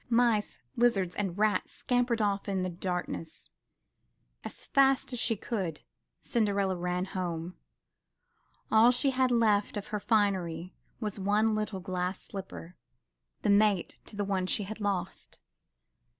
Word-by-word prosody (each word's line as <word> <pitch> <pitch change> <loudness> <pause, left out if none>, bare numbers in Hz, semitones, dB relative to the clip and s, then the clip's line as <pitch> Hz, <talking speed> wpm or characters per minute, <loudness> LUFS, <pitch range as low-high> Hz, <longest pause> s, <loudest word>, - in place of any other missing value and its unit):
Mice, 230 - +2
lizards 210 -7 +2
and 195 -3 -3
rat 210 -2 +2
scampered 245 -2 0
off 200 0 0
in 190 -2 0
the 185 - -1
darkness. 175 -2 -5 0.9
As - - -7
fast 270 -2 +3
as 245 - -2
she 225 - +2
could, 190 -7 -3 0.4
Cinderella 200 -5 +1
ran 180 +1 -1
home. 175 -2 -4 1.2
All 220 +2 +7
she 250 +3 +3
had 260 -1 +2
left 215 -3 +2
of 205 - -6
her 210 - -2
finery 185 -6 0 0.3
was 210 -3 -3
one 210 +3 +2
little 215 -3 -2
glass 185 0 -2
slipper, 185 -3 -8 0.7
the 210 - +3
mate 200 -3 +2
to - - -9
the 205 0 -1
one 190 -2 0
she 205 - +2
had 215 +3 -7
lost. 200 -3 -3
200 Hz, 135 wpm, -30 LUFS, 185-220 Hz, 1.2 s, All